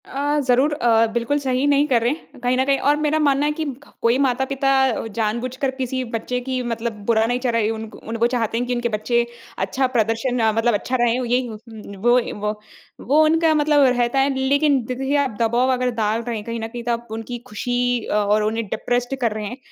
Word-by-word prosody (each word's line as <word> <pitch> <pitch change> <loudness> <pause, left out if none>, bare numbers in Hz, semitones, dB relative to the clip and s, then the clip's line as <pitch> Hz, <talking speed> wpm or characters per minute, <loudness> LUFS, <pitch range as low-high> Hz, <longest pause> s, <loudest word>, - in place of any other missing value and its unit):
अ, 290 +2 -1
ज़रूर 260 +4 +3
अ, 230 -5 +3
बिल्कुल 240 +5 0
सही 260 -1 0
नहीं 285 0 +4
कर 245 -5 +2
रहे 235 +2 +2
हैं 305 -2 -9
कहीं 245 +1 +2
न 260 - +3
कहीं 275 0 +2
और 295 - +5
मेरा 300 0 +1
मानना 285 -1 +2
है 300 - +1
कि 315 +1 -3 0.2
क - - -20
कोई 230 +2 +3
माता-पिता 270 +1 +1 0.5
जानबूझकर 245 +5 -1
किसी 260 -1 -3
बच्चे 250 +2 -2
की 260 -1 -1
मतलब 230 0 -3
बुरा 225 -1 +3
नहीं 245 +2 0
चाह 250 -1 0
रही 225 -2 +1
उनको 220 -1 -6
उन 230 - -3
वो - - +6
चाहते 230 -2 -1
हैं 245 - -1
कि 250 - -1
उनके 240 0 -1
बच्चे 235 +2 0 0.3
अच्छा 225 +8 0
प्रदर्शन 225 +3 0
अ, 220 -1 +3
मतलब 225 +2 +2
अच्छा 230 +5 -1
रहे। 240 +1 +2
ओ - - -2
यही 250 +2 +1
हो 220 -2 -7 0.5
वो 240 +1 +6
ए, 240 - -4
वो, 210 +1 -4 0.4
वो 300 +4 +4
उनका 320 +1 +3
मतलब 295 -1 +4
रहता 240 +2 +1
है 270 +1 +2
लेकिन 280 0 +2
दे 255 - -4
देखिए 270 +2 -1
आप 270 -7 -1
दबाव 240 +3 +2
अगर 250 0 0
डाल 215 +2 +1
रहे 235 0 -4
हैं 210 - -5
कहीं 230 0 -4
न 225 - -4
कहीं 240 +1 -7
तो 240 - -1
आप 235 0 -3
उनकी 225 +2 -5
खुशी 245 +1 -1
अ - - -3 0.2
और 210 0 +3
उन्हें 225 +1 -1
डिप्रेस्ड 245 +5 -1
कर 230 -2 +2
रहे 215 0 -4
हैं। 245 +5 -6
245 Hz, 235 wpm, -21 LUFS, 230-270 Hz, 0.5 s, वो